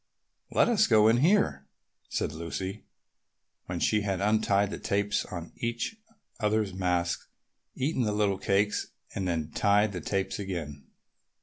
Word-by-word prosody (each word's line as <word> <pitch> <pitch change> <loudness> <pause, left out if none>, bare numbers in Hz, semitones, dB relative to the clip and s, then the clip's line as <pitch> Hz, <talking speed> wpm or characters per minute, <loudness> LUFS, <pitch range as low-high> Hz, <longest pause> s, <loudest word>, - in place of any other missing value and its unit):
"Let - - +3
us 235 -3 +4
go 110 -2 +6
in 115 - +4
here," 145 - +2 0.4
said - - -1
Lucy 95 +5 -5 0.8
when 90 - -3
they 105 -1 +2
had 100 -2 -1
untied 100 -1 +2
the - - -5
tapes 100 +1 0
on 85 -3 -7
each 120 - -2 0.4
other's 105 -2 +1
masks, 90 -2 -1 0.5
eaten 135 +1 0
the 110 -3 +1
little 105 -2 +1
cakes, 100 +2 +1 0.3
and 95 -1 -2
then 80 -3 -2
tied 100 +4 +3
the 90 -3 -5
tapes 95 +3 -2
again. 80 -8 -5
100 Hz, 140 wpm, -29 LUFS, 90-110 Hz, 0.8 s, go